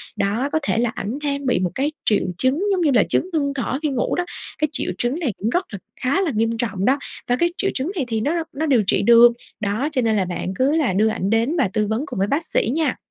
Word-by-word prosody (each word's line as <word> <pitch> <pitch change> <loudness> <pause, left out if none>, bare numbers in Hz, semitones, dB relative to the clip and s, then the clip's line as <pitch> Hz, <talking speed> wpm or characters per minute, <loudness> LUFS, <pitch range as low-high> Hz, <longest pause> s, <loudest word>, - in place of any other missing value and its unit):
Đó, 225 +8 0
có 315 - +1
thể 250 - 0
là 240 0 +2
ảnh 215 +7 -4
đang 280 -1 -2
bị 250 -7 +2
một 180 -2 -1
cái 285 +3 0
triệu 210 - +3
chứng, 265 - +1
giống 375 -2 +1
như 310 -4 +3
là, 225 - +5
chứng 365 - 0
ngưng 285 -3 0
thở 265 0 -2
khi 305 - +1
ngủ 260 -3 -1
đó. 355 - -1 0.3
Cái 305 - +1
triệu 295 - -2
chứng 245 - -1
này 280 - -1
cũng 215 - -1
rất 355 +9 0
là 200 - -5 0.2
khá 280 +9 0
là 355 -6 0
nghiêm 225 +1 +1
trọng 200 -5 -2
đó 265 +4 +3 0.3
và 245 - +2
cái 345 +6 +2
triệu 390 - 0
chứng 280 +7 -2
này 295 -8 -1
thì 225 -2 -1
nó 330 +7 0
nó 310 +3 -2
điều 260 -8 +3
trị - - +3
được. 235 +2 +7 0.3
Đó, 215 +7 -1
cho 265 -4 0
nên 225 -2 +1
là 190 - +1
bạn 180 +1 -4
cứ 260 +6 +2
là 305 -9 +1
đưa 210 +4 +3
ảnh 200 -3 -1
đến 230 +9 +1
và 275 - +3
tư 215 -2 +1
vấn 220 +5 -1
cùng 195 - -5
với 195 - +2
bác 295 +8 0
sĩ - - +1
nha. 310 -5 0
255 Hz, 280 wpm, -21 LUFS, 220-295 Hz, 0.3 s, được